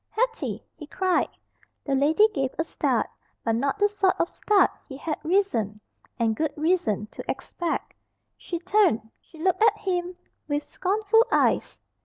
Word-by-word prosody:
"Hetty!" 470 0 -2
he 300 - -10
cried. 370 +2 +1 0.6
The 275 - -1
lady 305 +10 +5
gave 270 -9 -2
a 325 - +1
start, - - 0 0.4
but 225 - +2
not 275 - 0
the 410 0 +4
sort 400 -2 +1
of - - +1
start 420 -1 +3 0.2
he 270 - -7
had 305 +1 -3
reason, 310 - +1 0.4
and 225 -2 +1
good 310 +4 -1
reason, 300 - +1
to - - -8
expect. 340 -2 -3 0.4
She 345 - -5
turned, 345 - +2
she 325 - -18
looked 365 +5 +1
at 435 -1 +5
him 360 -3 -2 0.3
with 290 0 -1
scornful 425 +4 +2
eyes. - - +2
345 Hz, 155 wpm, -26 LUFS, 280-400 Hz, 0.6 s, lady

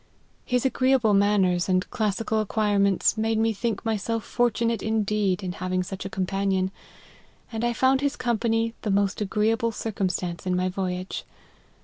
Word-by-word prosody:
His 250 0 0
agreeable 260 -4 +3
manners 195 -3 +3
and 185 0 +2
classical 220 +1 0
ac 215 - -1
quirements, 205 -1 +2
made 225 0 +1
me 225 0 +2
think 225 +3 -3
myself 225 +1 -1
fortunate 235 -2 0
in 220 0 0
deed, 200 -2 0
in 180 - -2
having 185 0 -2
such 190 +1 -7
a - - -3
companion, 190 -1 0 0.8
and 225 0 -3
I 240 0 +1
found 260 +3 +3
his 285 0 0
company 230 -1 0
the 215 - -3
most 200 +1 +1
agreeable 225 +3 +1
circumstance 185 -5 -3
in 180 - +1
my 185 +1 +1
voyage. 185 -1 -3
210 Hz, 155 wpm, -25 LUFS, 190-225 Hz, 0.8 s, agreeable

